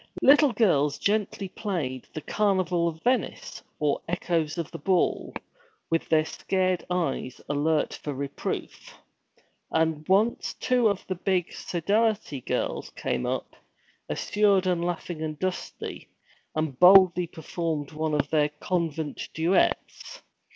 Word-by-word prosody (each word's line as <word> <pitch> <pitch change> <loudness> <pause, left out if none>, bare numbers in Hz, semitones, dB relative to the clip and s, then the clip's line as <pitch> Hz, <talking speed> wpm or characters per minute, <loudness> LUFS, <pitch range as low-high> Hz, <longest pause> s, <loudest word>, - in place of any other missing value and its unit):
Little 290 0 +7
girls 150 -11 +2
gently 205 0 0
played 165 - -4
'The 155 - -6
Carnival 185 -4 +1
of 160 -1 -5
Venice' 250 +1 -1 0.2
or 150 -2 +1
'Echoes 170 -3 -1
of 165 -3 -4
the - - -7
Ball,' 185 +4 +1 0.6
with 165 - 0
their 155 -1 +4
scared 185 +1 -1
eyes 165 -8 -2
alert 150 +1 +1
for 150 - -4
reproof. 140 0 -5 0.7
And 160 -1 0
once 210 +5 +2
two 250 -2 +2
of 200 -2 -3
the 185 - -2
'big' 185 -1 -1
Sodality 200 - 0
girls - - -2
came 65 - -2
up, - - -3 0.5
assured 200 -2 +2
and 175 -2 +1
laughing 175 -2 -3
and 155 -1 -3
dusty, 185 +2 -5 0.5
and 155 -4 -2
boldly 180 -1 +7
performed 160 -2 -4
one 155 0 -1
of 145 - -1
their 150 -2 +3
convent 160 0 -3
duets. 185 - 0
170 Hz, 125 wpm, -26 LUFS, 155-190 Hz, 0.7 s, Little